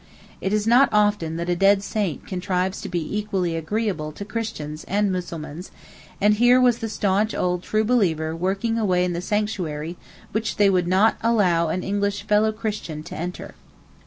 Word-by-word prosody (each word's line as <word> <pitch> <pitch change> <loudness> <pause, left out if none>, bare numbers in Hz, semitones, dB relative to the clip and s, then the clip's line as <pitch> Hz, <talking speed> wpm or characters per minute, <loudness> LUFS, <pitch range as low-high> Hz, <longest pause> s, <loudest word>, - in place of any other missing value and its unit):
It 190 - -1
is 210 0 +1
not 245 +4 +5
often 205 -6 +2
that 170 +1 -3
a 175 - +1
dead 195 +2 +4
saint 200 -7 -2
contrives 185 0 -2
to - - -6
be 175 +2 -2
equally 190 -5 -1
agreeable 165 -2 -2
to 200 - -7
Christians 200 -10 -5
and 205 0 +1
Mussulmans, 175 -2 -5 0.5
and 210 +1 +4
here 245 +4 +5
was 245 -2 +3
the 225 - -3
staunch 205 +1 0
old 180 -1 0
'true 215 +3 0
believer' 165 -9 +1
working 195 +6 -1
away 180 -4 +2
in 180 - -2
the 170 - -3
sanctuary 180 -6 -2 0.3
which 220 +1 -2
they 205 -1 +4
would 180 -2 +1
not 190 +5 +3
allow 190 -8 +2
an 180 +3 -2
English 200 0 -1
fellow 210 +1 +3
Christian 210 -8 -5
to - - -8
enter. 175 +2 -6
195 Hz, 175 wpm, -23 LUFS, 175-215 Hz, 0.5 s, not